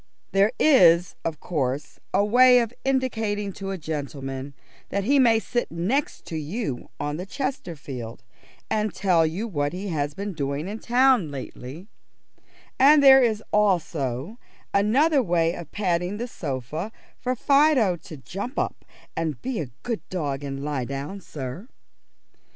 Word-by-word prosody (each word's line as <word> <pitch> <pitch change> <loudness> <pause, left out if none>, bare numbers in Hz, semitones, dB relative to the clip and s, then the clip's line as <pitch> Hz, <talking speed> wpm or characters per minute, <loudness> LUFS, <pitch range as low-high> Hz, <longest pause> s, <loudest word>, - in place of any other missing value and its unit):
There 200 +2 +4
is, 175 - +6
of 160 -2 -3
course, 145 -3 -3
a 200 - +3
way 250 +3 +6
of 235 -1 +1
indicating 220 -7 -1
to 195 0 -6
a 195 - -3
gentleman 140 -3 -5 0.3
that 200 - -1
he 275 +7 +3
may 235 -3 +5
sit 240 +2 -2
next 195 - -1
to 160 - -5
you 155 - -4
on 145 +1 -2
the 180 - -5
Chesterfield, 150 - -5 0.4
and 215 -1 -1
tell 175 -5 +3
you 190 +9 -3
what 145 -7 -1
he 195 +2 -4
has 145 -3 -2
been 200 0 -4
doing 140 +1 -3
in 210 +3 -5
town 245 - +3
lately, 140 +3 -8 0.9
and 285 +2 +7
there 270 -1 +9
is 220 -3 +1
also 170 - 0 0.3
another 270 +9 +4
way 170 -5 +1
of 170 -4 -9
patting 180 -1 -1
the 240 +3 -3
sofa 155 - -4 0.3
for 255 0 -1
Fido 275 - +4
to 160 -1 -11
jump 200 - -6
up - - -2 0.3
and 160 -5 -2
be 255 -4 -2
a 145 -6 -4
good 235 -3 -2
dog 145 -6 -3
and 135 0 -5
lie 145 -3 -2
down 140 +9 -5
sir. 150 - -7
185 Hz, 150 wpm, -25 LUFS, 145-230 Hz, 0.9 s, there